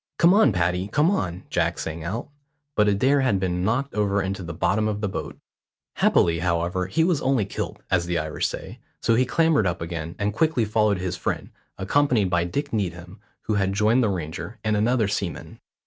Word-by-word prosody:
"Come 170 +2 +6
on, 200 - +5
Paddy, 90 0 0
come 150 - +2
on," 90 - -2
Jack - - 0
sang 80 0 -5
out; 100 +8 -4 0.5
but 105 -1 +3
Adair 130 +8 +3
had 125 -8 +2
been 90 -1 -1
knocked 130 +8 0
over 100 -1 +1
into 95 0 -2
the 85 -2 -6
bottom 100 +6 +1
of 105 -1 -2
the 105 - -1
boat. 95 - -5 0.6
Happily, 85 -1 +3
however, 90 +1 0
he 160 +11 +1
was 170 -3 +1
only 130 -6 +1
kilt, 100 - -5
as 85 0 +2
the 90 -1 0
Irish 75 -1 -1
say; - - -8 0.2
so 115 - +2
he 125 +2 +3
clambered 160 - +3
up 90 0 -2
again, 85 -1 -5
and 105 +1 -1
quickly 140 -2 +1
followed 105 -1 +2
his 90 0 -3
friend, - - -3 0.3
accompanied 110 -1 +2
by 85 -1 +2
Dick 140 +10 -3
Needham, 90 -2 -3 0.2
who 110 - -2
had 95 -2 +1
joined 110 +5 +3
the 110 - +2
Ranger, 85 +3 -5
and 110 -1 +1
another 110 +1 +2
seaman. 100 -6 -4
100 Hz, 195 wpm, -24 LUFS, 90-115 Hz, 0.6 s, Come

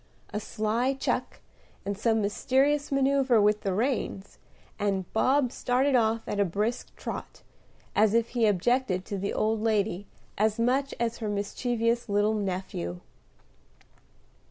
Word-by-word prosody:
A 210 - -1
sly 225 +5 -1
chuck, 270 - -2 0.4
and 200 0 -2
some 220 +1 +1
mysterious 275 +8 +1
manoeuvre 275 -3 +3
with 210 0 +3
the 195 - -1
reins, 215 -2 -2 0.4
and 195 -2 0
Bob 255 +3 +3
started 260 +3 +1
off 225 -2 +2
at 205 - -2
a - - +5
brisk 210 +7 -2
trot, - - -7 0.5
as 215 +1 +4
if 230 -1 +2
he 235 -3 +2
objected 205 -1 +1
to 200 - -4
the 200 +1 -2
old 220 0 0
lady 210 -3 0 0.3
as 215 +1 +2
much 260 +4 +1
as 235 -1 -1
her 220 -3 -2
mischievous 230 +3 -1
little 205 +1 +2
nephew. 185 - -3
220 Hz, 135 wpm, -28 LUFS, 205-245 Hz, 0.5 s, a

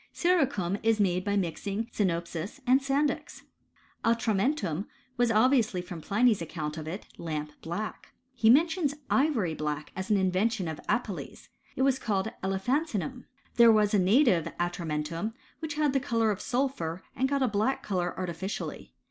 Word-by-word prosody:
* - - -45
Siricum 270 - +1
is 225 -1 +2
made 185 -2 +2
by 200 +1 0
mixing 195 +4 -2
sinopis 170 - -2
and 260 +2 +5
sandyx. 275 +2 -1 0.6
Atramentum 225 - +1 0.3
was 245 -1 +2
obviously 225 -3 +3
from 180 -2 -7
Pliny's 215 +2 +2
account 155 -2 -4
of 155 -1 -6
It 185 +6 -5
lamp 150 -2 -4
black. 205 +6 -5 0.2
He 230 -3 +3
mentions 315 +2 +4 0.2
ivory 260 - +2
black 150 -1 -3
as 190 +3 -4
ah 210 - +4
in 190 -2 +2
vention 200 0 0
of 155 - -7
Apelles: 230 -6 -3 0.3
it 265 - +1
was 265 -1 +3
called 205 0 -1
elephantinum. 245 - -1 0.3
There 235 -1 +8
was 210 -1 +3
a 205 - +5
native 190 - +4
atramentum, 170 +3 -2 0.2
which 310 -2 -4
had 300 -2 +2
the 270 - +3
colour 230 -4 +1
of 200 - -4
sulphur, 245 - -2
and 265 +1 +1
got 280 -1 +1
a - - +3
black 215 +5 0
colour 180 -4 -2
artificially. 185 +2 -5
210 Hz, 155 wpm, -29 LUFS, 175-255 Hz, 0.6 s, There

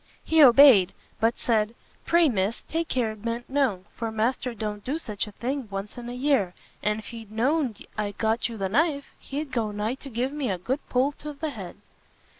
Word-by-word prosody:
He 320 -1 +4
obeyed, 250 -8 +8 0.3
but 225 +1 +2
said 220 -1 +1 0.3
"Pray 340 -1 +5
Miss, 210 -3 0
take 330 0 -2
care 245 -7 0
it 215 -1 -11
ben't 230 +2 -3
known, 260 -10 0
for 230 -1 -4
master 235 +2 -1
don't 210 -1 -4
do 280 +5 -2
such 215 -10 -4
a - - -9
thing 260 +3 -3
once 195 +1 -5
in 240 -1 -7
a - - -5
year, 250 -8 +1 0.3
and 210 0 +1
if 220 - -8
he 225 -2 -9
know'd 250 +2 0
I'd 205 -1 -2
got 225 +1 +1
you 230 - -7
the 195 -2 -1
knife, 285 - +1
he'd 285 0 -5
go 230 -4 0
nigh 210 +3 -2
to 275 +1 -9
give 250 +2 -1
me 290 -5 -2
a 190 - 0
good 250 +11 -2
polt 270 +4 0
of 295 -2 -6
the 310 0 -2
head." 195 -8 -8
235 Hz, 210 wpm, -26 LUFS, 210-275 Hz, 0.3 s, obeyed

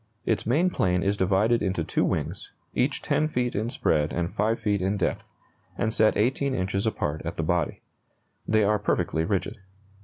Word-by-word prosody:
Its 110 - 0
main 150 +10 +3
plane 90 - +1
is 100 +1 +1
divided 100 +5 +2
into 95 -4 0
two - - 0
wings, - - -2 0.2
each - - 0
10 155 - +1
feet 125 -5 -1
in 110 +3 -1
spread 75 - +1
and 85 +2 -2
5 110 +3 +1
feet 105 -3 0
in 95 +3 0
depth, - - -2 0.5
and 110 - 0
set 110 0 +3
18 130 +4 +1
inches 95 +3 -1
apart 75 -8 -2
at 85 - -5
the 80 - -1
body. 85 +2 -1 0.7
They 110 0 +3
are 105 +1 +2
perfectly 80 0 0
rigid. 100 +3 -1
105 Hz, 180 wpm, -26 LUFS, 90-115 Hz, 0.7 s, main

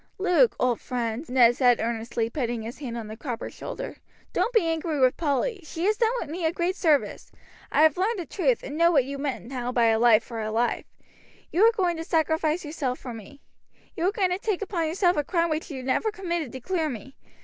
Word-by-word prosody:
"Luke, 380 +5 +3
old 250 -2 +1
friend," 240 +3 -3
Ned 245 -2 +5
said 245 -3 +4
earnestly, 230 0 -2
putting 240 -3 -3
his 235 +3 -7
hand 245 -5 -5
on 230 - -5
the 215 +1 -8
cropper's 245 -1 -5
shoulder, - - -6 0.4
"don't - - +1
be 450 -7 +3
angry 325 -2 -1
with 255 -1 +4
Polly, 335 - -1
she 330 +2 -4
has 425 +2 +3
done 460 -7 0
me 345 +2 -4
a 320 - +2
great 350 +2 -1
service. 310 -8 +1 0.4
I 305 - +4
have 315 0 +4
learned 415 +5 +1
the 350 - -4
truth, 280 - 0
and 285 - -6
know 335 +2 +4
what 275 -7 +3
you 280 +1 -5
meant 275 -4 -3
now 250 0 -4
by 240 -2 +3
a 220 0 +2
life 230 -1 +5
for 230 -1 -6
a 215 - -3
life. 230 +2 0 0.7
You 355 - +1
were 455 +1 +7
going 360 -6 0
to 325 - -4
sacrifice 320 0 0
yourself 280 -4 -3
for 245 - -8
me. 230 +6 -12 0.5
You 335 - -1
were 380 - +3
going 390 -4 0
to 360 - -1
take 415 -2 -1
upon 345 -5 -1
yourself 350 +1 +2
a 295 - +2
crime 335 +1 0
which 310 +1 -2
you 265 -4 -6
never 265 +12 +1
committed 345 - -3
to 260 - -7
clear 330 0 -1
me. 265 +2 -8
300 Hz, 225 wpm, -26 LUFS, 245-350 Hz, 0.7 s, were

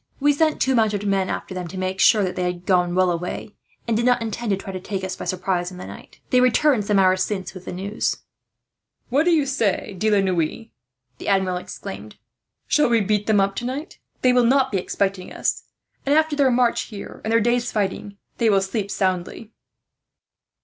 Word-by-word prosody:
"We 290 +1 +4
sent 310 +1 +1
two 265 - +2
mounted 210 -4 +1
men 195 -2 +1
after - - -4
them, 180 -1 -5
to 185 - -8
make 185 +1 -3
sure 210 -1 +5
that 180 -1 -2
they - - -2
had 175 0 -12
gone 180 -2 +2
well 185 -1 +3
away, 180 +4 -4 0.3
and 230 - +1
did 230 - +1
not 245 0 +3
intend 230 +1 -4
to 195 - +2
try 195 0 -8
to 185 - -4
take 190 +1 -5
us 190 - -3
by - - -7
surprise 180 -1 -1
in 180 - -10
the 180 - -8
night. - - -12
They 250 -1 +5
returned 250 -2 +3
some 205 -1 +2
hours 185 -1 +4
since 190 -2 -4
with 185 -1 -11
the - - -5
news." 200 +4 -2 0.9
"What 280 +6 +2
do - - +4
you 310 -4 +3
say, 225 -7 -1
De 215 +4 0
la 205 -2 +4
Noue," 185 +4 -1 0.5
the - - -8
Admiral 190 -2 +1
exclaimed; 105 - -8 0.5
"shall 300 -4 +3
we 230 -1 +4
beat 210 0 0
them 215 -2 +4
up 195 0 +1
tonight? 260 +6 -5 0.2
They 250 -1 +5
will 250 -1 +4
not 265 +2 +3
be 195 - +1
expecting 195 0 -2
us - - -2 0.4
and, 280 +1 +2
after 315 -1 +2
their 280 -2 +3
march 245 -1 +2
here 205 -3 -9
and 220 - -2
their 230 - +5
day's 240 +2 +1
fighting, 200 -1 -2 0.2
they 230 - +3
will 195 -2 +4
sleep 195 +1 -3
soundly." 190 +3 -2
205 Hz, 210 wpm, -22 LUFS, 185-240 Hz, 0.9 s, sure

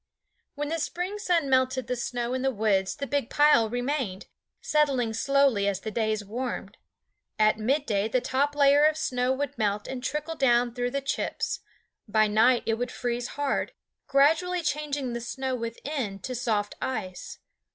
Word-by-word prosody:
When 290 +1 -3
the 330 +1 -1
spring 365 +6 -3
sun 345 -7 +1
melted 260 -1 +2
the 250 +1 -2
snow 240 0 -3
in 260 - -1
the 270 - +2
woods 205 -5 +1
the 280 - -4
big 280 -3 -1
pile 290 -7 +4
remained, 245 -5 -2 0.3
settling 275 -7 +1
slowly 275 -4 +2
as 200 -2 -1
the 220 - -5
days 215 -1 -1
warmed. 245 +5 -5 0.6
At 215 0 +3
midday 220 -4 +1
the 255 +3 +1
top 280 +4 0
layer 285 0 +5
of 310 0 +4
snow 250 -5 0
would 280 0 -3
melt 210 -1 0
and 255 -2 -5
trickle 300 +3 -2
down 245 -5 +2
through 245 0 -1
the 275 +2 -2
chips; 275 - -2 0.5
by 215 +1 +3
night 225 +4 +4
it 225 0 0
would 245 0 -2
freeze 245 -1 -2
hard, 285 - -1 0.3
gradually 325 +6 +3
changing 290 -4 -2
the 235 - -3
snow 260 +2 -3
within 230 -1 -4
to 255 - -4
soft 220 -4 -1
ice. 185 -8 -4
255 Hz, 165 wpm, -27 LUFS, 225-285 Hz, 0.6 s, layer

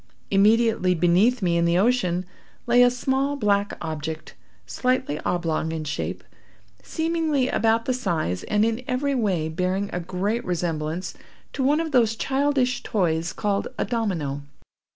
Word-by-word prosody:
Immediately 210 -2 +3
beneath 190 +8 +3
me 170 -2 +2
in 170 - +2
the 170 +1 +2
ocean, 185 -5 +1 0.4
lay 245 0 +4
a 245 - +7
small 265 +3 -1
black 205 -5 0
object, 155 0 -5 0.3
slightly 250 - -1
oblong 165 -2 -1
in 160 -1 -3
shape, 150 0 -4 0.6
seemingly 320 -5 0
about 225 0 +1
the 255 - +1
size, 155 - -1
and 210 +1 +2
in 230 +2 -1
every 275 +3 0
way 195 -11 0
bearing 185 +5 -2
a 180 - -1
great 190 +7 -2
resemblance 170 -1 -3 0.4
to 270 - -2
one 290 +4 +3
of 325 -1 -2
those 230 -4 +3
childish 265 -1 0
toys 170 -7 0
called 205 -2 -1
a - - 0
domino. 175 - -2
205 Hz, 145 wpm, -24 LUFS, 170-250 Hz, 0.6 s, a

